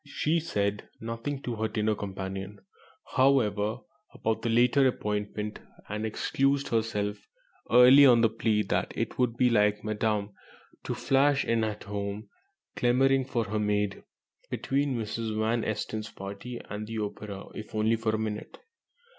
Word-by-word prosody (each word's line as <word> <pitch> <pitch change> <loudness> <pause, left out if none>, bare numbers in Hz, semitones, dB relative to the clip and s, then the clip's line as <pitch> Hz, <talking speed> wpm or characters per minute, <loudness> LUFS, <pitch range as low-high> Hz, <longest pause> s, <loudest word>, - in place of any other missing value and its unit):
She 155 +3 0
said 105 -9 -2
nothing 115 +5 -4
to 120 -2 -3
her 110 +1 0
dinner 110 0 0
companion, 95 0 -6 0.4
however, 115 -4 +2 0.3
about 110 0 -2
the 120 - -1
later 125 +4 +4
appointment, 105 -2 -3 0.3
and 105 +1 -3
excused 135 +5 0
herself 110 -3 -1 0.5
early 130 +4 +8
on 120 -2 +6
the 115 - +5
plea 110 -1 +1
that - - -1
it - - -3
would 120 -2 +1
be 125 -1 +4
"like 105 -2 +3
Madame 105 -1 -1 0.5
to - - -2
flash 140 +1 +2
in 115 -1 +1
at 105 -1 -3
home, 100 +1 -5 0.5
clamouring 130 +2 +3
for 120 -3 -1
her 105 0 -2
maid, 105 -1 0 0.5
between 140 0 0
Mrs. 110 0 -3
Van 110 +2 +1
Esten's 110 0 -3
party 100 +5 -7
and 105 +1 -5
the 115 0 -5
opera, 105 -1 -5
if 110 0 -8
only 110 +1 +2
for 110 -1 -1
a - - -2
minute." 110 -1 -4
110 Hz, 145 wpm, -28 LUFS, 105-120 Hz, 0.5 s, early